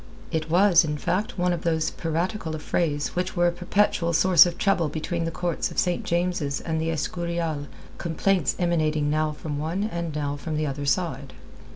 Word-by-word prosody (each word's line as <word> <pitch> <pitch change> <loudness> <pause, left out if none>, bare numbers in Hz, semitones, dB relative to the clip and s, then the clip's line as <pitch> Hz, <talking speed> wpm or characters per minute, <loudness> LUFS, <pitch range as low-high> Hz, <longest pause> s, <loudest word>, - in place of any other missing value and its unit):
It 160 -1 -2
was, 180 0 +5
in 150 -2 -2
fact, 190 +7 -2
one 180 0 +2
of 170 - -3
those 160 -2 0
piratical 165 +1 -2
affrays 150 -1 -1
which 180 +2 -3
were 175 -1 +3
a 175 - +4
perpetual 175 -1 +1
source 175 +1 +7
of 175 0 -4
trouble 180 -6 +2
between 165 +2 -3
the - - 0
courts 175 0 -2
of - - -11
St. 180 -1 +1
James's 170 -5 -1
and 160 -1 -2
the 160 - -1
Escurial, 165 -2 -2 0.3
complaints 170 -1 +1
emanating 155 -4 +1
now 155 0 +1
from 150 -1 -5
one 165 +6 -2
and 170 -6 -3
now 145 -1 -2
from 155 +1 -4
the 155 - 0
other 145 0 -3
side. 150 -5 -1
165 Hz, 185 wpm, -25 LUFS, 155-175 Hz, 0.3 s, source